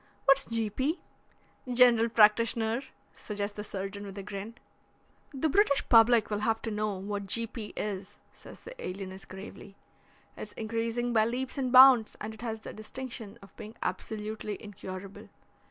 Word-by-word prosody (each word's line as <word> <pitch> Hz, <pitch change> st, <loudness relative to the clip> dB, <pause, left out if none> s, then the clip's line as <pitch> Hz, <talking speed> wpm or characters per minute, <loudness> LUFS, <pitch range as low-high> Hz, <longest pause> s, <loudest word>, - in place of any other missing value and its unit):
"What's 275 Hz, 0 st, +4 dB
G. 225 Hz, -2 st, -2 dB
P.?" 280 Hz, -, -1 dB, 0.7 s
"General 240 Hz, -2 st, +5 dB
practitioner," 225 Hz, +2 st, +3 dB, 0.3 s
suggests 205 Hz, -1 st, -5 dB
the 210 Hz, -, -5 dB
surgeon 200 Hz, 0 st, -5 dB
with 200 Hz, -1 st, -9 dB
a 200 Hz, -, -5 dB
grin. 205 Hz, +3 st, -7 dB, 0.8 s
"The 280 Hz, +2 st, 0 dB
British 310 Hz, -3 st, +2 dB
public 230 Hz, -1 st, +6 dB
will 205 Hz, -, 0 dB
have 225 Hz, +1 st, +1 dB
to 225 Hz, -, -3 dB
know 210 Hz, -1 st, -1 dB
what 200 Hz, +1 st, -5 dB
G. 230 Hz, +4 st, +2 dB
P. 220 Hz, -1 st, -7 dB
is," 205 Hz, -1 st, -4 dB, 0.2 s
says -, -, -14 dB
the 480 Hz, -, -10 dB
alienist 190 Hz, 0 st, -7 dB
gravely. 195 Hz, +1 st, -10 dB, 0.6 s
"It's -, -, -7 dB
increasing 230 Hz, +2 st, -2 dB
by 220 Hz, -1 st, +4 dB
leaps 260 Hz, +4 st, -3 dB
and 255 Hz, -2 st, -1 dB
bounds, 255 Hz, -3 st, +8 dB
and 215 Hz, +1 st, -5 dB
it 220 Hz, -, -11 dB
has 225 Hz, -2 st, -4 dB
the -, -, -8 dB
distinction 230 Hz, -1 st, -7 dB
of 195 Hz, -, -16 dB
being 220 Hz, +1 st, -10 dB
absolutely 210 Hz, +2 st, -4 dB
incurable. 195 Hz, -2 st, -9 dB
220 Hz, 155 wpm, -29 LUFS, 205-235 Hz, 0.8 s, bounds